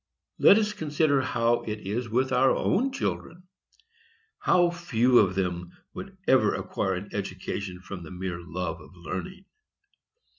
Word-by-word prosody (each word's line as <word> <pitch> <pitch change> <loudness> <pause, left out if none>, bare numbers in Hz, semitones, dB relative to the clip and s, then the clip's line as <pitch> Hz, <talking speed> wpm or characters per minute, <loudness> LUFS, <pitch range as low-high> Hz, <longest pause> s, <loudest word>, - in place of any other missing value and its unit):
Let 200 - +8
us 210 -1 +1
consider 150 -5 +1
how 120 -2 +1
it 105 -1 -5
is 110 +5 -3
with 130 +4 +1
our 130 +1 +4
own 265 +6 +1
children; 180 -8 -4 1.0
how 175 -1 +3
few 130 -8 +3
of 95 -3 +3
them 90 -2 -2 0.2
would 195 0 -9
ever 130 -1 +4
acquire 95 -1 -2
an 95 +3 -6
education 95 -1 -4
from 95 -1 -8
the 80 - -9
mere 90 -1 -5
love 90 +1 -5
of - - -15
learning. 95 - -6
115 Hz, 145 wpm, -27 LUFS, 95-155 Hz, 1.0 s, Let